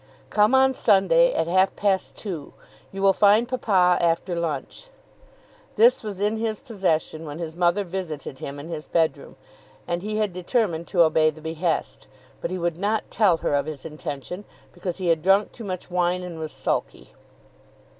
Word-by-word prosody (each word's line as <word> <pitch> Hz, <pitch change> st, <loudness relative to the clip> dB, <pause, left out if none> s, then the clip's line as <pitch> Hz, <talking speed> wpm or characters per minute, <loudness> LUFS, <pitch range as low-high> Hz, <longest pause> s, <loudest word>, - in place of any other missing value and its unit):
"Come 210 Hz, +4 st, +4 dB
on 265 Hz, 0 st, +5 dB
Sunday 260 Hz, -, +4 dB
at -, -, 0 dB
half 185 Hz, +3 st, +2 dB
past 195 Hz, -2 st, 0 dB
two. 175 Hz, -9 st, -6 dB, 0.4 s
You 195 Hz, 0 st, -5 dB
will 195 Hz, 0 st, +6 dB
find 210 Hz, +4 st, +4 dB
papa 190 Hz, -9 st, +2 dB
after 170 Hz, +1 st, +1 dB
lunch." 170 Hz, -, -4 dB, 0.9 s
This 470 Hz, +3 st, +5 dB
was 205 Hz, -4 st, -6 dB
in 210 Hz, +2 st, 0 dB
his 220 Hz, -1 st, -2 dB
possession 185 Hz, -, -1 dB
when 150 Hz, -1 st, -7 dB
his 165 Hz, -1 st, -6 dB
mother 175 Hz, +3 st, +2 dB
visited 170 Hz, -8 st, -6 dB
him 140 Hz, +1 st, -6 dB
in 145 Hz, -, -8 dB
his 160 Hz, -2 st, -6 dB
bedroom, 165 Hz, -2 st, -1 dB, 0.5 s
and 175 Hz, 0 st, -2 dB
he 215 Hz, +2 st, -3 dB
had 210 Hz, -4 st, 0 dB
determined 180 Hz, -2 st, -1 dB
to 175 Hz, -3 st, +4 dB
obey 155 Hz, -1 st, +3 dB
the 155 Hz, 0 st, -9 dB
behest. 160 Hz, +1 st, -3 dB, 0.3 s
But -, -, -2 dB
he 185 Hz, -, -3 dB
would 170 Hz, -2 st, -2 dB
not 210 Hz, +3 st, -1 dB
tell 195 Hz, -7 st, +3 dB
her -, -, +1 dB
of 140 Hz, +1 st, +1 dB
his 155 Hz, -2 st, -7 dB
intention, 155 Hz, +3 st, -6 dB, 0.3 s
because 180 Hz, -4 st, -5 dB
he 185 Hz, -3 st, -1 dB
had 165 Hz, -1 st, +2 dB
drunk 195 Hz, +4 st, +3 dB
too 230 Hz, -, -10 dB
much 185 Hz, -1 st, -6 dB
wine, 180 Hz, 0 st, 0 dB
and 175 Hz, -2 st, -7 dB
was 155 Hz, -1 st, -5 dB
sulky. -, -, -3 dB
180 Hz, 175 wpm, -24 LUFS, 160-205 Hz, 0.9 s, will